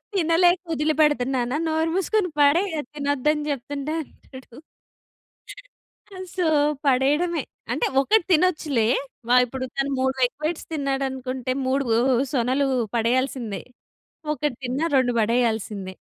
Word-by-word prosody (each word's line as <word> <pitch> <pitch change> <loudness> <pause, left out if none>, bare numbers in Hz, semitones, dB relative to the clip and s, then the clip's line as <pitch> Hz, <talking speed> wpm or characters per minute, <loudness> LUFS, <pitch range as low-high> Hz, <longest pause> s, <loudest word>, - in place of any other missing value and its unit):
తినలేక 350 0 +3
ఒదిలి 310 0 +1
పెడతన్నానా. 260 -4 +1
నోరు 320 +1 0
మూసుకొని 385 0 +1
పడేయి, 310 +7 +4
అది 290 - -6
తినొద్దని 290 +1 0
జెప్తుంటే 280 +2 -4
అంటాడు. 260 -4 -14 1.6
ఆ! - - -9 0.2
సో, 360 -2 +1 0.4
పడేయడమే. 290 +6 +2 0.3
అంటే, 475 - 0
ఒకటి 415 +8 +3
తినొచ్చులే. 310 -8 +2 0.4
వ - - -4 0.2
ఇప్పుడు 260 +2 -5
తను 275 +1 0
3 265 0 0
ఎగ్ 245 - -12
వైట్స్ 320 +1 -2
తిన్నాడనుకుంటే, 265 -3 -2
3 270 +2 +1
వూ 225 - +3 0.4
సొనలు 265 +2 +1 0.3
పడెయ్యాల్సిందే. 240 -2 -1 0.7
1 295 -3 -2
తిన్నా, 260 +6 -1
2 250 -2 +2
పడెయ్యాల్సిందే. 220 -4 -1
275 Hz, 115 wpm, -23 LUFS, 255-310 Hz, 1.6 s, పడేయి